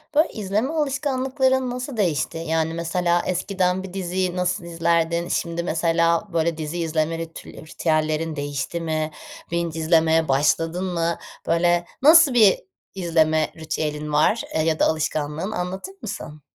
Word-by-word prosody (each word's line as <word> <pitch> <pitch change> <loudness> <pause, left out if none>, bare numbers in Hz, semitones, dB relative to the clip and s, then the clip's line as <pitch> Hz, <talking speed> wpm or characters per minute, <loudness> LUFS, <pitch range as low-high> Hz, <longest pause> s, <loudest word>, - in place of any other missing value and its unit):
Böyle, 310 - +5
izleme 215 +8 -1
alışkanlıkların 265 -3 0
nasıl 250 0 -5
değişti? 165 -6 0
Yani, 160 0 -1
mesela 170 +1 0
eskiden 185 0 0
bir 185 - -9
diziyi 185 -1 -2
nasıl 180 +1 -1
izlerdin? 170 0 0
Şimdi 170 -1 -2
mesela, 170 +2 +1
böyle, 165 0 +1
dizi 155 +2 -4
izleme 165 0 0
ritül 165 0 -8
ritüellerin 155 0 -1
değişti 145 +3 -3
mi? 155 -1 -2 0.4
binge 170 -1 -2
izlemeye 160 0 +3
başladın 165 +6 +1
mı? 170 -2 -1 0.3
Böyle, 175 +1 +2 0.2
nasıl 310 0 +7
bir 215 -5 +6 0.4
izleme 160 -4 +2
ritüelin 150 -1 -3
var, 155 +9 +3
eee, 160 - +2
ya 160 0 0
da - - +4
alışkanlığın? 155 +3 -1
Anlatır 190 - -4
mısın? 155 -7 -7
170 Hz, 135 wpm, -23 LUFS, 160-190 Hz, 0.4 s, nasıl